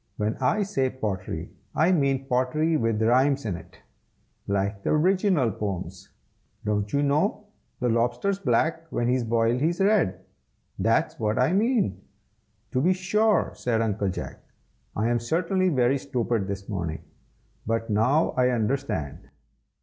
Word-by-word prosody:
When 105 +1 -1
I 200 +12 +1
say 185 -10 0
pottery, 95 -8 -4 0.2
I 165 +4 +3
mean 135 -5 +1
pottery 135 +5 +1
with 115 -6 +1
rhymes 130 +4 +3
in 100 -5 -1
it, - - -13 0.7
like 100 0 -1
the 155 - +1
Riginal 180 - +2
Poems. 95 -2 -5 0.6
Don't 105 -1 -1
you 140 0 +1
know 155 +9 +1 0.3
'The 125 - 0
Lobster's 120 +12 0
black, 160 +3 0
when 120 +1 +1
boiled 115 +2 +2
he's 170 +3 +1
red?' 195 - +2 0.6
that's 115 +4 +1
what 110 -1 0
I 130 +7 +2
mean." 215 - +1 0.7
"To 130 - +1
be 180 +6 +4
sure!" 210 +4 +1
said 115 -2 -1
Uncle 105 -3 0
Jack. 95 - -6 0.6
"I 110 +2 0
am 120 0 +1
certainly 175 +9 +1
very 135 -2 +2
stupid 115 -6 -1
this 95 -1 -5
morning, 85 -6 -4 0.6
but 115 0 -1
now 125 +10 +3
I 125 0 +2
understand. 110 - -2
125 Hz, 140 wpm, -26 LUFS, 105-160 Hz, 0.7 s, be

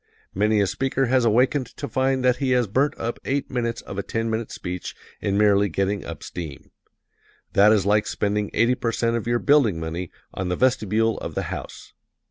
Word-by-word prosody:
Many 105 +2 +2
a - - +3
speaker 135 +6 0
has 130 -1 +2
awakened 125 +4 +2
to 145 - -4
find 130 -1 0
that 125 -1 +4
he 135 -2 -1
has 125 -1 +3
burnt 135 +9 +1
up 115 +1 -3
eight 140 +1 -2
minutes 115 -2 -2
of 100 - -6
a - - +1
ten 115 +3 -2
minute 110 0 -3
speech 90 0 -6 0.3
in 100 0 0
merely 100 -1 +4
getting 95 +3 -1
up - - -8
steam. 80 -7 -8 0.8
That 105 +2 +6
is 105 -4 +3
like 105 +1 +2
spending 105 0 -1
eighty 115 +2 +3
percent 115 -1 0
of 115 -1 -3
your 120 0 +2
building 120 - +3
money 80 +2 -4 0.2
on 95 -1 -3
the 90 - 0
vestibule 115 -2 +1
of - - -6
the - - -1
house. - - -8
110 Hz, 195 wpm, -23 LUFS, 100-125 Hz, 0.8 s, That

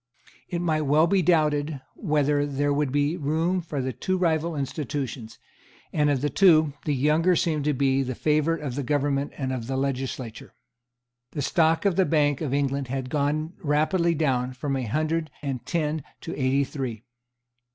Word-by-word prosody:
It 175 -1 -2
might 155 -2 +1
well 150 +3 +5
be 190 +2 +2
doubted 150 -3 +2
whether 150 -4 +1
there 145 +1 0
would 145 -2 0
be 145 +4 +1
room 165 +4 0
for 150 -5 -4
the 130 0 -2
two 185 - -1
rival 165 -2 +1
institutions; 135 -4 -4 0.6
and 150 -1 +2
of 140 -3 +1
the 145 - +1
two, 160 -4 +5
the 150 - +1
younger 155 +6 +3
seemed 155 -3 0
to 150 - +2
be 135 0 +2
the 130 -1 -3
favourite 155 +3 +1
of 135 -4 -3
the 145 - -2
government 140 +1 0
and 130 -2 -2
of 120 -3 -4
the 135 0 -2
legislature. 130 -3 -4 0.8
The 145 - -2
stock 165 +4 +2
of 195 -3 +2
the 190 - +4
Bank 145 -3 +2
of 150 -5 -2
England 140 -1 0
had 130 0 -4
gone 155 +3 0
rapidly 165 +3 +2
down 130 -5 0
from 135 +2 -3
a 130 -2 -2
hundred 155 +5 -1
and 135 -4 -3
ten 155 -3 -1 0.2
to 165 - -5
eighty 135 +1 +2
three. 130 -6 -5
145 Hz, 175 wpm, -25 LUFS, 135-160 Hz, 0.8 s, well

